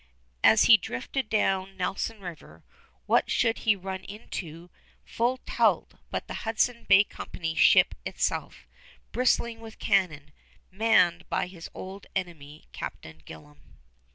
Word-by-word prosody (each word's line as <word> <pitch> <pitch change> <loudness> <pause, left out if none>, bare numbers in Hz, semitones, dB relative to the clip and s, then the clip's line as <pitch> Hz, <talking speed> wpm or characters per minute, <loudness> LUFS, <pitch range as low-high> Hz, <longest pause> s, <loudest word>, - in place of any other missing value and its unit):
As 220 - +6
he 230 - +8
drifted 215 - -4
down 195 -3 0
Nelson 200 +4 -3
River, 175 -4 -10 0.4
what - - +2
should 230 -1 +1
he 220 -2 +3
run 190 0 -6
into 175 -5 -8 0.3
full 240 +3 0
tilt - - +1 0.2
but - - -4
the - - -6
Hudson's 235 +1 -1
Bay 195 - +7
Company 160 -5 -6
ship - - +5
itself, - - -3 0.5
bristling 235 -2 +1
with 225 -1 -11
cannon, 155 -6 0 0.4
manned 185 -4 +2
by - - 0
his 180 -2 -10
old 190 +2 -9
enemy, 155 -5 -6
Captain 80 0 -8
Gillam! 75 -2 -13
190 Hz, 125 wpm, -27 LUFS, 165-220 Hz, 0.5 s, he